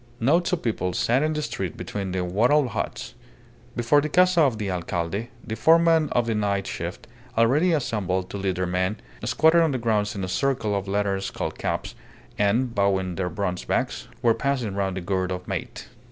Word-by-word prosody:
Knots 165 - +2
of 180 - -1
people 90 -6 -1
sat 120 +8 +2
in 155 +1 +1
the 150 0 -2
street 95 - -4
between 100 -2 -4
the 90 0 -1
wattled 120 +10 +3
huts. 110 - -4 0.6
Before 120 +5 +3
the 155 - -2
casa 180 +1 +4
of 135 -7 +3
the 105 -2 -3
alcalde, 90 +4 -2 0.2
the 110 - -4
foremen 160 +5 +4
of 120 -1 +2
the 115 - 0
night 100 -2 0
shift, - - -5 0.3
already 140 +10 +4
assembled 100 - -1
to - - -4
lead 95 -2 -1
their 90 +1 -1
men, 90 +4 -1 0.3
squatted 160 +7 +4
on 160 -4 +2
the - - 0
ground 110 -3 0
in 95 - -3
a - - -2
circle 115 0 0
of 100 0 -3
leather 100 -1 0
skull 95 - -3
caps, - - -3 0.5
and, 115 +5 +2
bowing 95 -3 +1
their 90 +1 -2
bronze 90 0 -3
backs, - - -2 0.2
were 115 -1 +5
passing 120 -3 -1
round 95 -1 -1
the - - -3
gourd 95 +1 -1
of 90 0 -5
mate. - - -5
105 Hz, 195 wpm, -25 LUFS, 95-135 Hz, 0.6 s, were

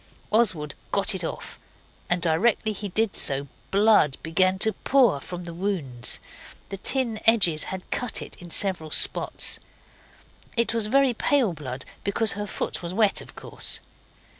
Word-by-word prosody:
Oswald 185 -10 +3 0.2
got 200 +1 +3
it 185 -2 -3
off, - - -6 0.5
and 175 -1 0
directly 200 +7 +2
he 205 0 -6
did 220 +2 0
so 140 0 0 0.2
blood 200 -9 +4
began 185 +4 +2
to 220 +3 +1
pour 250 - +2
from 180 +5 -8
the 170 -1 -8
wounds. 165 -10 -2 0.5
The 195 - -5
tin 235 +1 0
edges 180 -9 +6
had 190 -1 -7
cut 245 -2 -2
it - - -9
in 175 - -12
several 175 -3 +2
spots. - - +2 1.0
It 235 0 +1
was 225 -2 -1
very 270 +2 +3
pale 240 -4 +1
blood, 135 -5 -7 0.2
because 215 +2 +1
her 205 +1 -4
foot - - -4
was 175 +1 -6
wet, 215 -2 +2
of - - -14
course. - - -4
195 Hz, 155 wpm, -25 LUFS, 165-220 Hz, 1.0 s, edges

